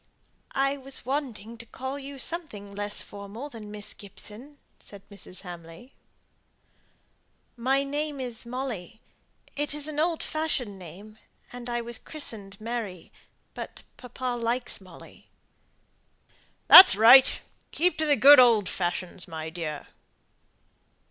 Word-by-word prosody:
"I 275 Hz, +1 st, +1 dB
was 270 Hz, 0 st, -6 dB
wanting 240 Hz, -5 st, -4 dB
to 235 Hz, -, -8 dB
call 265 Hz, +4 st, -6 dB
you 280 Hz, 0 st, -9 dB
something 260 Hz, -11 st, -1 dB
less 205 Hz, +1 st, -3 dB
formal 205 Hz, +8 st, -9 dB
than 220 Hz, -5 st, -10 dB
Miss 210 Hz, 0 st, -8 dB
Gibson," 215 Hz, +8 st, -11 dB, 0.2 s
said 200 Hz, -1 st, -13 dB
Mrs. 200 Hz, -2 st, -9 dB
Hamley. 175 Hz, +6 st, -11 dB, 1.6 s
"My 265 Hz, +3 st, +1 dB
name 290 Hz, +1 st, -3 dB
is 245 Hz, -3 st, -5 dB
Molly. 235 Hz, -5 st, -6 dB, 0.6 s
It 295 Hz, 0 st, -2 dB
is 300 Hz, 0 st, 0 dB
an 300 Hz, -1 st, -4 dB
old 330 Hz, +1 st, 0 dB
fashioned 270 Hz, -10 st, -2 dB
name, 200 Hz, +5 st, -13 dB, 0.3 s
and 245 Hz, 0 st, -8 dB
I 240 Hz, 0 st, -2 dB
was 235 Hz, -1 st, -6 dB
christened 205 Hz, -10 st, -7 dB
Mary. 215 Hz, -6 st, -6 dB, 0.4 s
But -, -, -9 dB
papa 250 Hz, 0 st, -5 dB
likes 235 Hz, -1 st, -2 dB
Molly." 185 Hz, -3 st, -16 dB, 1.4 s
"That's 375 Hz, -, +11 dB
right. 240 Hz, +5 st, +7 dB, 0.3 s
Keep 355 Hz, 0 st, 0 dB
to 315 Hz, -, +1 dB
the 290 Hz, -, +4 dB
good 285 Hz, 0 st, +8 dB
old 230 Hz, -6 st, +5 dB
fashions, 180 Hz, 0 st, -4 dB
my 160 Hz, -1 st, -6 dB
dear." 160 Hz, -3 st, -6 dB
235 Hz, 125 wpm, -26 LUFS, 200-275 Hz, 1.6 s, That's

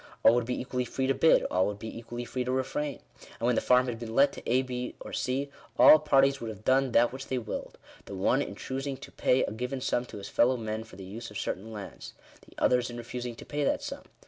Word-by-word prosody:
All 115 Hz, -, +8 dB
would 120 Hz, -1 st, +1 dB
be 125 Hz, -, -2 dB
equally 125 Hz, 0 st, -2 dB
free 130 Hz, +2 st, -2 dB
to 135 Hz, -, +3 dB
bid; 135 Hz, +5 st, +5 dB
all 95 Hz, +1 st, +3 dB
would 105 Hz, 0 st, -3 dB
be 110 Hz, +2 st, -7 dB
equally 120 Hz, +1 st, -6 dB
free 125 Hz, +1 st, -3 dB
to 125 Hz, -, -2 dB
refrain. 135 Hz, +2 st, -2 dB, 0.4 s
And 115 Hz, -, -2 dB
when 125 Hz, -, +3 dB
the -, -, +1 dB
farm 125 Hz, 0 st, +4 dB
had 120 Hz, -3 st, -4 dB
been 115 Hz, -1 st, -6 dB
let 140 Hz, +1 st, +5 dB
to -, -, -8 dB
A, 130 Hz, +2 st, +4 dB
B, 125 Hz, -1 st, -4 dB
or -, -, -9 dB
G, 135 Hz, +2 st, -2 dB, 0.3 s
all 155 Hz, -, +9 dB
parties 140 Hz, -2 st, +3 dB
would 115 Hz, -, -4 dB
have 110 Hz, -1 st, -9 dB
done 130 Hz, 0 st, +3 dB
that 120 Hz, +1 st, +4 dB
which 130 Hz, 0 st, -7 dB
they 130 Hz, -, -1 dB
willed 115 Hz, -3 st, -5 dB
— -, -, -22 dB
the -, -, -6 dB
one -, -, +2 dB
in -, -, -4 dB
choosing 135 Hz, +1 st, -4 dB
to 135 Hz, -, -11 dB
pay 130 Hz, +1 st, +2 dB
a -, -, -2 dB
given 125 Hz, +4 st, -3 dB
sum 125 Hz, -1 st, 0 dB
to 115 Hz, -, -10 dB
his 100 Hz, -, -7 dB
fellow 125 Hz, +2 st, +3 dB
men 110 Hz, -1 st, -4 dB
for 115 Hz, -, -14 dB
the 95 Hz, -, -9 dB
use 115 Hz, +5 st, -7 dB
of 105 Hz, -, -8 dB
certain 100 Hz, +2 st, -4 dB
lands 105 Hz, -3 st, -8 dB, 0.2 s
— -, -, -24 dB
the -, -, -20 dB
others 125 Hz, -1 st, +2 dB
in 120 Hz, -, -7 dB
re 120 Hz, -, -6 dB
fusing 125 Hz, -1 st, -5 dB
to -, -, -10 dB
pay 145 Hz, 0 st, -2 dB
that -, -, +1 dB
sum. -, -, -5 dB
125 Hz, 275 wpm, -29 LUFS, 115-130 Hz, 0.4 s, all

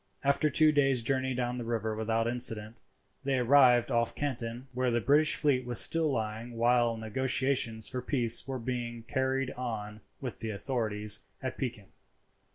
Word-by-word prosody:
After 140 Hz, +2 st, +2 dB
two 155 Hz, +2 st, +4 dB
days' 135 Hz, -5 st, +1 dB
journey 130 Hz, +1 st, 0 dB
down 125 Hz, 0 st, -2 dB
the -, -, -4 dB
river 110 Hz, -2 st, -3 dB
without 110 Hz, +1 st, -1 dB
incident, 115 Hz, -2 st, -1 dB, 0.4 s
they 135 Hz, -1 st, 0 dB
arrived 125 Hz, -1 st, +4 dB
off 115 Hz, -1 st, +1 dB
Canton, 120 Hz, -3 st, -4 dB
where 125 Hz, 0 st, 0 dB
the 120 Hz, 0 st, +1 dB
British 145 Hz, +6 st, +4 dB
fleet 140 Hz, -4 st, +1 dB
was 120 Hz, -1 st, +3 dB
still 165 Hz, -2 st, +3 dB
lying 115 Hz, 0 st, -4 dB
while 120 Hz, 0 st, +2 dB
negotiations 120 Hz, 0 st, 0 dB
for 130 Hz, -2 st, -5 dB
peace 120 Hz, -3 st, +3 dB
were 135 Hz, -1 st, -3 dB
being 120 Hz, -1 st, -5 dB
carried 130 Hz, +1 st, -1 dB
on 110 Hz, -5 st, -6 dB, 0.2 s
with 125 Hz, -3 st, -7 dB
the 110 Hz, -, -5 dB
authorities 105 Hz, -2 st, 0 dB, 0.2 s
at 130 Hz, -1 st, -4 dB
Pekin. 120 Hz, -7 st, -6 dB
120 Hz, 160 wpm, -29 LUFS, 115-130 Hz, 0.4 s, two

